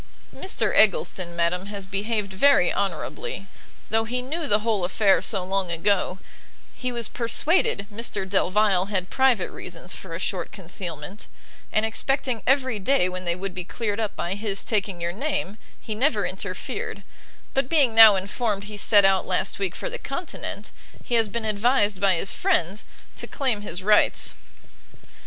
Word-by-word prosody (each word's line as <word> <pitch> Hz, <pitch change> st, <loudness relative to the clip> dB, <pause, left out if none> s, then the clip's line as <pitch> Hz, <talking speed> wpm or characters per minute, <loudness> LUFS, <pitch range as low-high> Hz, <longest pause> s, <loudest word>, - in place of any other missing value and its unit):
"Mr 375 Hz, -, -1 dB
Eggleston, 185 Hz, -, +3 dB
madam, 175 Hz, +3 st, 0 dB
has 200 Hz, -2 st, -6 dB
behaved 200 Hz, +1 st, -2 dB
very 205 Hz, -2 st, +4 dB
honourably; 200 Hz, -, -3 dB, 0.5 s
though 225 Hz, 0 st, +2 dB
he 245 Hz, +2 st, -2 dB
knew 310 Hz, +4 st, -4 dB
the 210 Hz, -2 st, +2 dB
whole 215 Hz, -4 st, 0 dB
affair 195 Hz, +2 st, +3 dB
so 195 Hz, -4 st, -1 dB
long 190 Hz, -1 st, -1 dB
ago, 185 Hz, +2 st, 0 dB, 0.6 s
he 250 Hz, -1 st, -3 dB
was 235 Hz, -2 st, -3 dB
persuaded 235 Hz, -, +2 dB
Mr 205 Hz, -3 st, -3 dB
Delvile 195 Hz, 0 st, +2 dB
had 190 Hz, -3 st, -2 dB
private 260 Hz, -7 st, +2 dB
reasons 175 Hz, +1 st, -6 dB
for 170 Hz, -3 st, -8 dB
a -, -, -5 dB
short 185 Hz, -2 st, -2 dB
concealment; 175 Hz, -1 st, -6 dB, 0.4 s
and 215 Hz, +1 st, +2 dB
expecting 250 Hz, +1 st, -1 dB
every 260 Hz, -4 st, +2 dB
day 205 Hz, -2 st, +2 dB
when 185 Hz, 0 st, -6 dB
they 170 Hz, 0 st, +1 dB
would 190 Hz, +1 st, -5 dB
be 180 Hz, 0 st, -4 dB
cleared 210 Hz, +3 st, -3 dB
up 215 Hz, -2 st, -2 dB
by 175 Hz, -, -2 dB
his 200 Hz, -1 st, -3 dB
taking 200 Hz, -4 st, -1 dB
your 170 Hz, 0 st, -2 dB
name, 220 Hz, -4 st, -3 dB, 0.2 s
he 220 Hz, -, -5 dB
never 260 Hz, +8 st, +1 dB
interfered: -, -, -5 dB, 0.5 s
but 270 Hz, -1 st, 0 dB
being 280 Hz, -8 st, +3 dB
now 220 Hz, -2 st, +10 dB
informed 200 Hz, +1 st, -2 dB
he 205 Hz, 0 st, -8 dB
set 205 Hz, 0 st, +5 dB
out 195 Hz, -1 st, +3 dB
last 190 Hz, +2 st, -1 dB
week 190 Hz, -3 st, -1 dB
for -, -, -5 dB
the -, -, -5 dB
continent, -, -, -6 dB, 0.3 s
he -, -, -6 dB
has 225 Hz, -2 st, +3 dB
been 230 Hz, +1 st, -3 dB
advised 210 Hz, -2 st, +2 dB
by 195 Hz, -2 st, +4 dB
his 180 Hz, +3 st, -1 dB
friends 215 Hz, -, 0 dB, 0.3 s
to -, -, -4 dB
claim 255 Hz, -7 st, -1 dB
his 185 Hz, -3 st, -6 dB
rights." 210 Hz, +1 st, +3 dB
205 Hz, 165 wpm, -24 LUFS, 190-235 Hz, 0.6 s, now